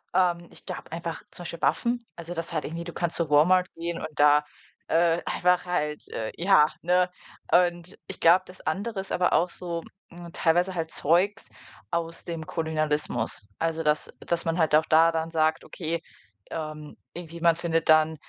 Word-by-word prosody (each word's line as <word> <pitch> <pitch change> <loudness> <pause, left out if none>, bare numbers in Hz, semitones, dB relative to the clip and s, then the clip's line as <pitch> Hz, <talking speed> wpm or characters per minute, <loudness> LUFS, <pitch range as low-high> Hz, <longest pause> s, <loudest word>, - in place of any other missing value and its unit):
Ähm, 175 -2 +2
ich - - -16
glaube - - -7
einfach 165 0 -5
zum 175 - -7
Beispiel 170 0 -7
Waffen, 240 0 +1 0.2
also, 170 +1 -7
das 165 0 -5
halt 155 - -1
irgendwie 170 +2 -5
du 170 - -7
kannst 170 -1 -1
zu 170 -3 -1
Walmart 180 +5 +5
gehen 170 0 -4
und - - -4
da, 150 0 +5 0.4
äh, 170 0 +3
einfach 180 0 +2
halt, 150 -4 -2
äh, 110 -1 -4
ja, 170 -4 +5
ne? 180 +1 +2 0.4
Und 175 0 +2
ich 195 - -8
glaube, 175 +3 +6
das 185 - -13
andere 200 +6 -3
ist 195 - -10
aber 180 0 +2
auch 175 +1 +3
so, 170 -2 -5 0.3
hm, 175 -1 -11
teilweise 175 +3 +2
halt 165 -2 -3
Zeugs 185 +8 +1 0.4
aus 170 -1 -3
dem 165 -2 -5
Kolonialismus. 155 -8 -1
Also, 165 0 -1
dass 150 0 +1
dass 170 0 -1
man 165 +1 0
halt 155 -2 +2
auch 155 +1 +4
da 165 +1 +5
dann 165 0 -2
sagt, 160 -1 +1
okay, 165 -1 -4 0.5
ähm, 155 -2 -6 0.2
irgendwie, 170 -1 -8
man 170 -1 +5
findet 165 -2 -1
dann, 155 0 +5
170 Hz, 180 wpm, -26 LUFS, 160-175 Hz, 0.5 s, glaube